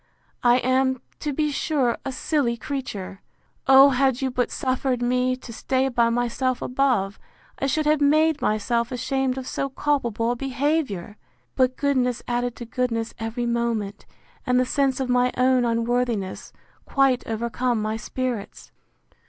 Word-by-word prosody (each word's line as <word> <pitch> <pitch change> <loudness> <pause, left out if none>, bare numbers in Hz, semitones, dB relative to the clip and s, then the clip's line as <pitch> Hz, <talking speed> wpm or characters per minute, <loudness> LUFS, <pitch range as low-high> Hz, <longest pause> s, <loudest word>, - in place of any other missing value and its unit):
—I 240 0 +5
am, 260 0 +1 0.2
to 300 - -2
be 300 +1 0
sure, 275 -4 0
a 270 - -3
silly 255 -2 0
creature! 205 -8 -5 0.5
O 270 +1 +8
had 265 -1 +2
you 265 -1 -1
but 245 -1 0
suffered 255 -1 -1
me 250 +1 +1
to 255 -2 -11
stay 260 +3 0
by 235 -2 +2
myself 245 +2 0
above, 250 -7 0 0.4
I 275 - 0
should 305 +3 0
have 300 0 +3
made 310 +1 +3
myself 235 +3 0
ashamed 260 +1 -1
of 260 - -5
so 275 +1 -2
culpable 240 -5 0
a - - -1
behaviour!—But 255 - -2
goodness 255 -4 0
added 245 0 -1
to 240 - -8
goodness 230 -2 -2
every 225 +2 -3
moment, 235 -4 -2 0.4
and 250 0 +2
the 255 - +2
sense 270 0 +1
of 265 - -1
my 250 0 +2
own 255 0 +3
unworthiness, 230 -3 -1 0.3
quite 270 -2 +2
overcome 235 +1 -1
my 215 +1 -1
spirits. 240 -2 -5
250 Hz, 145 wpm, -24 LUFS, 235-270 Hz, 0.5 s, O